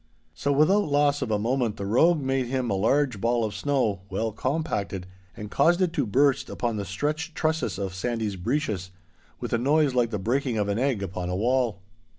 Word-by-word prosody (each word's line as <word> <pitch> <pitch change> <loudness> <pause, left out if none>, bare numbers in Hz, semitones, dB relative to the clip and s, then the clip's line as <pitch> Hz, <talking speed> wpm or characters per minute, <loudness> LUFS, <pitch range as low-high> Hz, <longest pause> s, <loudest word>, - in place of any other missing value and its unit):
So 140 +12 -1
without 170 +9 +4
loss 145 -1 +2
of - - -2
a 105 - +2
moment 120 0 0
the 100 - -4
rogue 150 - +3
made 135 -1 0
him 130 -2 -1
a - - +2
large 115 +3 +1
ball 115 0 +1
of 105 - -4
snow, 125 -9 0
well 110 +4 -1
compacted, 105 - -2 0.3
and 105 -1 -7
caused 170 +5 +3
it 180 -3 +1
to - - 0
burst 140 +5 +2
upon 115 -3 -2
the 100 - -3
stretched 150 - -3
trusses 160 -6 -1
of 95 -2 -3
Sandy's 110 +1 -2
breeches, 95 - -2 0.5
with - - -4
a 115 - +2
noise 145 +2 +3
like 120 -2 +2
the 105 - -2
breaking 120 +4 -1
of 105 -1 0
an 100 +2 0
egg 125 -6 0
upon 90 -1 -4
a 90 - -1
wall. 115 -2 0
120 Hz, 200 wpm, -26 LUFS, 100-145 Hz, 0.5 s, without